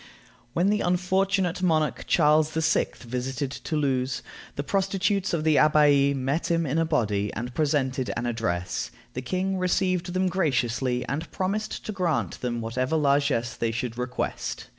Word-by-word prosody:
When 185 +4 +2
the 210 - +1
unfortunate 185 0 +1
monarch 160 -4 +1
Charles 155 -1 +4
VI. 160 0 +2
visited 130 +3 -3
Toulouse, 135 -4 -1 0.3
the 140 - -2
prostitutes 195 +2 0
of 165 -3 0
the 155 -1 +3
Abbaye 145 -2 +5
met 135 +5 -1
him 165 -1 +2
in 150 +3 0
a 165 - +2
body, 105 -10 0
and 120 +2 -4
presented 135 -4 0
an 120 - -2
address. 90 -7 -2 0.2
The 125 - -4
king 185 +7 -1
received 185 -1 0
them 185 +1 +1
graciously, 130 -8 0
and 150 +2 -3
promised 200 +4 -3
to - - -3
grant 180 -6 -1
them 120 -2 -2
whatever 125 +6 -1
largess 140 -5 +1
they 115 - -1
should 115 +1 -3
request. 125 +1 -4
150 Hz, 150 wpm, -26 LUFS, 125-180 Hz, 0.3 s, Abbaye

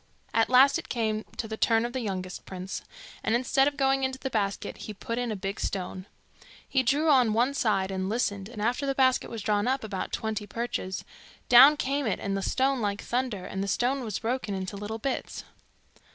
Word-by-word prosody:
At 225 0 +3
last 260 +2 +6
it - - -10
came 220 -2 -1
to 225 - -3
the 220 0 -5
turn 225 0 +3
of 240 - -5
the 260 - -1
youngest 185 -5 -4
prince, 185 0 -6 0.4
and 220 - +2
instead 265 +3 +3
of 290 -1 -2
going 270 -1 +2
into 265 0 -1
the 265 0 -5
basket 200 -3 -2
he 215 - -7
put 230 +4 -4
in 245 -2 -1
a - - -2
big 195 +1 -4
stone. 185 0 -4 0.6
He 265 - +2
drew 290 +5 +2
on 250 -6 +4
one 245 +5 +2
side 195 -7 +1
and 190 0 -2
listened, 205 -3 -1
and 215 -3 -6
after 245 +5 0
the 275 - 0
basket 260 -1 +3
was 225 -3 -6
drawn 205 +1 +1
up 265 0 0
about 200 -3 -4
twenty 220 -1 -3
perches, 230 -5 -4 0.4
down 270 +5 +9
came 275 -1 -1
it 205 - -1
and 195 -1 -2
the 195 - -1
stone 265 +5 +1
like 205 -1 -2
thunder, 245 -6 -2
and 190 0 -3
the - - -3
stone 250 +7 0
was 215 -4 -3
broken 230 -3 -2
into 190 +1 -4
little 210 +2 -5
bits. 260 +4 -3
225 Hz, 210 wpm, -28 LUFS, 200-260 Hz, 0.6 s, down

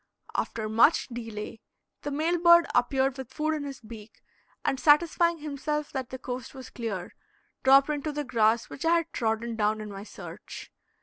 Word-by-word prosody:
After 220 -1 -2
much 230 +9 +4
delay, 225 -2 -7 0.4
the 290 - -4
male 320 +5 0
bird 340 0 +7
appeared 265 +1 +1
with 265 -1 -7
food 310 +3 -1
in 300 -2 -3
his 275 -3 -7
beak, 215 -1 -12 0.4
and 265 - 0
satisfying 335 +3 +4
himself 300 0 -3
that 260 -3 -4
the 260 - -6
coast 255 0 -6
was 260 -1 -10
clear, 205 -7 -5 0.5
dropped 275 +2 +6
into 300 +1 -2
the 295 0 -3
grass 230 -2 +2
which - - -8
I 330 +1 +4
had 335 -1 -1
trodden 225 0 -1
down 215 0 +1
in 210 -1 -7
my 195 0 -7
search. - - -10
265 Hz, 175 wpm, -28 LUFS, 225-300 Hz, 0.5 s, bird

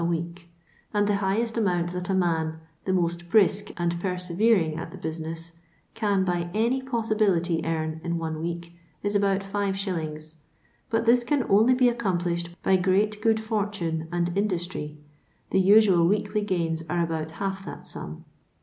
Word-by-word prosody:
a - - -1
week; 170 +1 -3 0.5
and 205 0 +3
the 205 -1 +2
highest 220 +4 0
amount 175 -5 +1
that 180 0 -4
a - - +2
man, 160 -3 0 0.3
the 190 - 0
most 175 -1 -1
brisk 205 0 +3
and 170 -1 -1
persevering 180 -1 +1
at 160 - -5
the - - -10
business, 165 +1 -5 0.4
con 205 -4 +1
by 175 -1 -1
any 235 +5 +2
possibility 215 -9 +1
earn 160 -1 -2
in 170 0 -1
one 160 -1 -3
week 170 0 -4 0.3
is 205 0 +1
about 200 -1 +2
5s., 190 -6 -3 0.6
but 225 0 +1
this 240 +1 +5
can 265 +2 +1
only 220 +6 +4
be 250 0 +3
accom 235 -7 +1
plished 170 -1 -2
by 190 - +4
great 200 +3 +1
good 220 0 +3
fortune 200 -7 -2
and 175 0 -1
industry 175 -6 -2 0.3
— - - -40
the 190 - +4
usual 190 -3 +6
weekly 210 +2 +1
gains 170 -5 -1
are 175 +1 +1
about 160 -1 -2
half 195 -1 -3
that - - -8
sum. - - -8
185 Hz, 165 wpm, -26 LUFS, 170-210 Hz, 0.6 s, usual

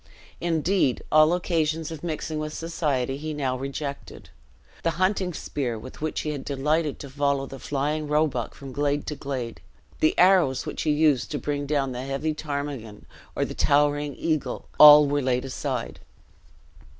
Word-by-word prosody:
Indeed, 170 -3 +1
all 155 +1 +6
occasions 165 -3 0
of 160 -1 -8
mixing 155 -2 -3
with 155 0 -4
society 140 -6 -1
he 155 +1 -5
now 135 -3 -1
rejected. 140 +2 -6 0.5
The 165 - +1
hunting 185 0 +1
spear 135 -7 -3
with 130 +6 -11
which 155 0 -2
he 150 - -3
had 140 -3 -5
delighted 150 +2 0
to 140 - -8
follow 140 0 0
the 135 0 -9
flying 150 +3 -2
roebuck 150 -5 0
from 135 -1 -9
glade 145 +1 0
to 150 - -4
glade, 130 -5 -5 0.4
the 155 - +2
arrows 180 -8 +4
with - - -4
which - - -5
he - - 0
used 150 -4 +2
to 150 - -2
bring 145 -1 -3
down 140 -2 0
the 125 0 -5
heavy 135 +4 -2
ptarmigan 140 -8 -5 0.3
or - - 0
the - - -6
towering 145 0 +2
eagle, 155 -3 -2
all 150 0 +11
were 145 0 0
laid 125 0 0
aside. 130 -2 -4
145 Hz, 165 wpm, -25 LUFS, 135-155 Hz, 0.5 s, all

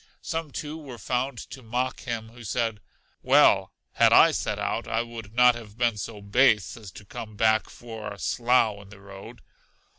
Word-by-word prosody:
Some, 165 -3 -3
too, 150 +3 -6
were 135 -6 -10
found 125 +2 -2
to 130 +1 -9
mock 125 +2 -2
him, 115 -3 -5
who 120 +1 -14
said 115 0 -2 0.4
Well, - - +4 0.2
had - - +4
I - - +7
set - - -2
out, - - -2
I 115 +1 0
would 115 -2 -10
not 125 0 +6
have 110 -3 -11
been 120 -2 +1
so 105 0 -7
base 105 -2 +3
as 110 -4 -11
to 105 - -12
come 110 +2 -8
back 110 0 +2
for 110 -3 -8
a 100 - -9
slough 110 +5 +1
in 100 - -16
the 105 -1 -14
road. 100 0 -12
115 Hz, 185 wpm, -26 LUFS, 105-125 Hz, 0.4 s, I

